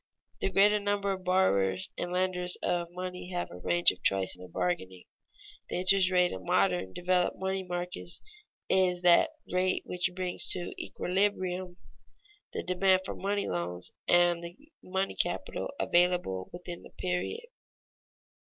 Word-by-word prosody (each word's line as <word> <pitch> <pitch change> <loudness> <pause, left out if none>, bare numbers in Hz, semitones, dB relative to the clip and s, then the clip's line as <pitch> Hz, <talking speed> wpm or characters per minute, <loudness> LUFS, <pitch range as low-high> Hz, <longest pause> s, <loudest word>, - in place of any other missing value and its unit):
The - - 0
greater 205 +2 +4
number 200 -1 0
of 190 -1 -4
borrowers 100 - +2
and 175 - -4
lenders 180 -1 0
of 175 -1 0
money 180 0 -6
have 180 -1 -3
a 90 - -9
range 175 - +3
of - - -13
choice 95 -1 +4
in - - -9
their 90 - -9
bargaining. 90 +1 -2 0.7
The - - -3
interest 185 +1 +4
rate 180 -1 +3
in 95 - -6
modern 95 0 +1
developed 180 - +1
money 190 0 -2
markets 175 -1 -4 0.5
is 180 -1 +2
that 180 - +6 0.2
rate 185 0 +1
which 180 0 -1
brings 185 -1 -2
to 175 -1 -5
equilibrium 185 -1 -1 0.8
the - - -4
demand 185 +1 +3
for - - -4
money 200 +1 -2
loans 90 0 -3 0.2
and 175 -1 +4
the 170 0 -8 0.2
money 190 +1 -2
capital - - -2
available 175 - +1
within 175 -1 -7
the - - -13
period. 180 - -3
180 Hz, 145 wpm, -30 LUFS, 170-185 Hz, 0.8 s, that